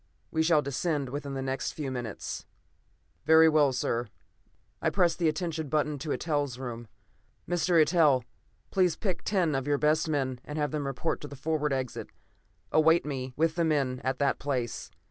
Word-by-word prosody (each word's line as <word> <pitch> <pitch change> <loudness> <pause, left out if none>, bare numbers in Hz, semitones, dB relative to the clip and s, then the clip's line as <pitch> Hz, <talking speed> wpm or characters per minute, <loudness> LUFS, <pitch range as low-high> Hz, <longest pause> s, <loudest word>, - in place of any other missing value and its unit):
We 160 - +1
shall 160 -2 +4
descend 140 0 -1
within 140 +1 -5
the 135 - -3
next 135 0 -2
few 145 -4 -4
minutes." 120 -5 -5 0.8
"Very 160 +1 +7
well, 150 -3 +4
sir." 120 -2 -1 0.7
I - - +2
pressed 175 -3 +2
the 170 - +2
attention 160 -1 -3
button 150 0 0
to 155 +3 -5
Eitel's 145 -6 -1
room. 120 -3 -6 0.6
"Mr. 175 0 +2
Eitel, 155 -5 +4 0.5
please 180 -3 +3
pick 190 -5 -3
ten 180 -7 +1
of 135 0 -1
your 145 -1 +2
best 155 +2 +2
men 130 -4 -1
and 150 - -6
have 150 -1 0
them 150 -2 -2
report 135 +5 -2
at 145 - -6
the 140 - -8
forward 150 +1 -1
exit. 130 -2 -3 0.6
Await 160 +1 +4
me, 130 -3 -4
with 160 +1 +2
the 170 +1 0
men, 140 -5 0
at 130 +1 -1
that 140 -1 +1
place. 130 -4 -3
150 Hz, 175 wpm, -29 LUFS, 135-160 Hz, 0.8 s, Very